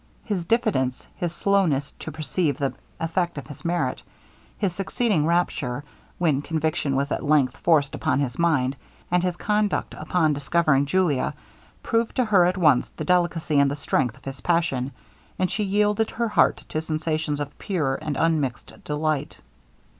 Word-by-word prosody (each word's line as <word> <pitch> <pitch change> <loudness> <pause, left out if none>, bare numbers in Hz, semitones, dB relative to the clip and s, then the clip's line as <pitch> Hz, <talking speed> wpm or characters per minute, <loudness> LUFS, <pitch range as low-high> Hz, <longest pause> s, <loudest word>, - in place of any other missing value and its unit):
His 195 -6 -2
diffidence 175 - 0
his 175 -2 -2
slowness 175 -8 +1
to 160 - -6
perceive 155 0 -1
the 140 -1 -1 0.3
effect 170 0 -1
of 145 - -5
his 145 - -11
merit 175 0 -1 0.6
his 195 -5 0
succeeding 195 -3 0
rapture, 145 -6 0 0.3
when 155 -6 +2
conviction 155 -2 -1
was 140 +2 0
at - - -1
length 145 -4 +3
forced 150 -5 +3
upon - - 0
his 130 -2 -2
mind; 145 -6 +2 0.4
and 180 0 +3
his 180 -1 -1
conduct 210 -1 0
upon 160 -4 +1
discovering 145 -1 +2
Julia, 170 -5 +1 0.5
proved 230 0 0
to 255 - +2
her 195 -5 +5
at 180 +2 +1
once 150 -8 +4
the - - -7
delicacy 175 -4 +2
and 140 0 +4
the 140 - -2
strength 125 -4 0
of - - -21
his 135 0 -6
passion, 160 -7 +1 0.5
and 185 - 0
she 210 - 0
yielded 210 +2 +2
her 235 0 -1
heart - - +3
to 155 - -1
sensations 155 -1 -2
of 145 0 -5
pure 155 -9 0
and 150 -3 -3
unmixed 150 -7 -1
delight. 150 -1 -1
160 Hz, 160 wpm, -24 LUFS, 145-180 Hz, 0.6 s, her